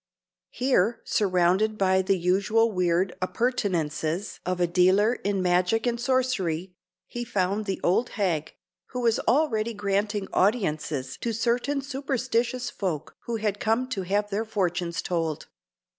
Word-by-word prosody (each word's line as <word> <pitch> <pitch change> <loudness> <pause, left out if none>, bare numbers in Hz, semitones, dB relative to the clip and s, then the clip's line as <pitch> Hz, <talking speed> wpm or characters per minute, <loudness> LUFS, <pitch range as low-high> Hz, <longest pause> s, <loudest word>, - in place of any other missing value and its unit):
Here, 240 -4 +1
surrounded 190 +2 +2
by 190 -1 +3
the 190 +1 +1
usual 200 +6 +2
weird 180 -1 +1
appurtenances 185 - -1
of 180 0 -1
a 175 - +4
dealer 185 +6 +4
in 200 -5 -2
magic 180 +6 +2
and 235 -1 -1
sorcery, 205 -10 0 0.3
he 240 - -5
found 205 -2 -1
the 195 -2 -2
old 210 +8 +2
hag, 170 -7 -1 0.3
who 250 - -4
was 230 -2 +2
already 235 -4 +2
granting 205 0 -1
audiences 155 - 0
to 235 - -2
certain 245 +5 0
superstitious 255 -3 -1
folk 170 -7 -4
who 235 - -1
had 210 -2 -1
come 225 +4 +1
to 205 -7 -2
have 205 +3 -1
their 205 +3 0
fortunes 175 -5 -1
told. 165 -4 -2
205 Hz, 135 wpm, -26 LUFS, 180-235 Hz, 0.3 s, a